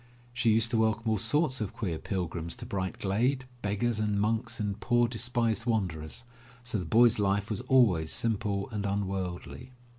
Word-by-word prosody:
She 115 -1 +1
used 115 +1 +3
to 115 - +2
welcome 110 +1 +1
all 110 - +1
sorts 130 - +1
of 105 - -4
queer 90 -8 -3
pil 95 -3 -2
grims 85 0 -4
to - - -8
Bright 95 -1 -3
Glade, 125 +7 0 0.2
beggars 105 +2 0
and 105 -1 0
monks 115 +3 -1
and 105 -1 -2
poor 120 +1 +3
despised 120 0 -1
wanderers, 95 -3 -2 0.4
so 115 -3 -2
the 90 - -4
boy*s 115 +5 +5
life 100 +1 +1
was 105 - -2
always 100 -12 +4
simple 105 -3 -1
and 105 -2 -3
unworldly. 95 +4 -4
110 Hz, 175 wpm, -29 LUFS, 100-115 Hz, 0.4 s, boy*s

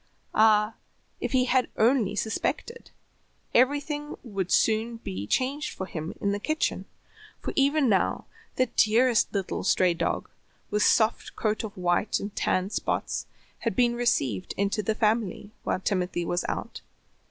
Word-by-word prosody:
Ah, 215 0 +4 0.5
if - - -3
he 255 -1 +3 0.3
only 230 -2 +3
had - - -6
suspected, 460 - -2 0.6
everything 290 +3 +1
would 195 -7 -3
soon 225 +1 +2
be 100 - -6
changed 275 - -1
for 190 - -3
him 160 -2 -6
in 200 - 0
the 205 - -1
kitchen, 310 +8 -1 0.5
for - - -5
even 280 0 +3
now 195 -5 +1 0.3
the 255 - +3
dearest 235 +1 +3
little 195 -2 -2
stray 180 -2 +3
dog, 170 - -2 0.4
with 210 0 +1
soft 220 +1 +2
coat 215 0 -1
of 210 -3 -7
white 180 +3 +1
and 200 0 -6
tan 185 +2 0
spots, - - -2 0.3
had - - -2
been 245 -2 +3
received 135 - 0
into 200 +2 0
the 215 +2 -1
family 215 -2 0
while - - -1
Timothy 180 -3 -1
was 175 +1 -1
out. - - -5
215 Hz, 145 wpm, -27 LUFS, 190-245 Hz, 0.6 s, Ah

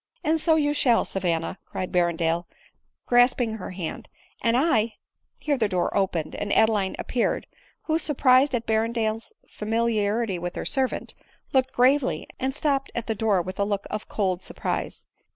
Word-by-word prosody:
" - - -41
And 320 +1 +2
so 320 0 +4
yotfshall, 290 -6 +3
Savanna," 175 -2 -2
cried 185 - -4
Berrendale, 170 -1 +1 0.6
grasp 245 +1 +4
ing 225 -3 -1
her 195 - -7
hand, 180 -3 -6 0.2
" - - -33
and 230 +1 +2
I 235 -7 +2
— - - -59
" - - -39
here 290 -3 +1
the 215 -3 +2
door 180 -2 0
opened, 185 -5 0
and, 205 0 -4
Adeline 215 -4 +3
appeared; 245 - -1 0.4
who, 320 0 +1
surprised 265 -3 +4
at 230 -1 -2
Berrendale's 220 0 -1 0.2
fami 230 +2 -1
liarity 210 -2 0
with 175 +1 -5
her - - -4
servant, 265 -2 0 0.4
looked 260 -1 +2
gravely, 260 +2 +2
and 265 +1 -1
stopped 280 -3 0
at 235 - -2
the 225 - -1
door 205 -4 +1
with 185 +2 -7
a - - +3
look 200 -1 -2
of 215 - -5
cold 190 -3 -1
surprise. - - -4
225 Hz, 175 wpm, -25 LUFS, 195-260 Hz, 0.6 s, so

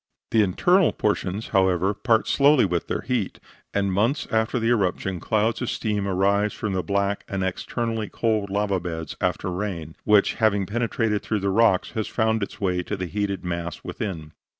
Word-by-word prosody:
The 110 - +4
internal 175 - +3
portions, 105 0 -1
however, 95 -1 +2
part 110 +1 +1
slowly 140 -2 +5
with 90 -3 -1
their - - -2
heat, 120 -7 -2 0.3
and 100 -1 0
months 115 +10 +1
after 110 +2 +1
the 115 -1 +1
eruption 95 -4 0
clouds 110 +5 0
of 120 - -1
steam 105 -3 -1
arise 100 +2 +2
from 105 -3 -3
the 95 - 0
black 100 +1 -1
and 95 -1 -2
externally 110 +3 -2
cold 110 -3 0
lava 100 -1 0
beds 80 -3 -5
after 90 - -1
rain; 90 -4 -4
which, 105 -1 +4
having 100 -3 +2
penetrated 115 0 -1
through 110 -2 -2
the 100 0 0
cracks, 105 -3 +3
has 110 -1 -2
found 110 -1 +1
its 100 - -5
way 90 -2 0
to 100 +3 -4
the 90 - -3
heated 100 0 -3
mass 85 -1 -4
within. 80 -8 -5
100 Hz, 175 wpm, -24 LUFS, 95-110 Hz, 0.3 s, slowly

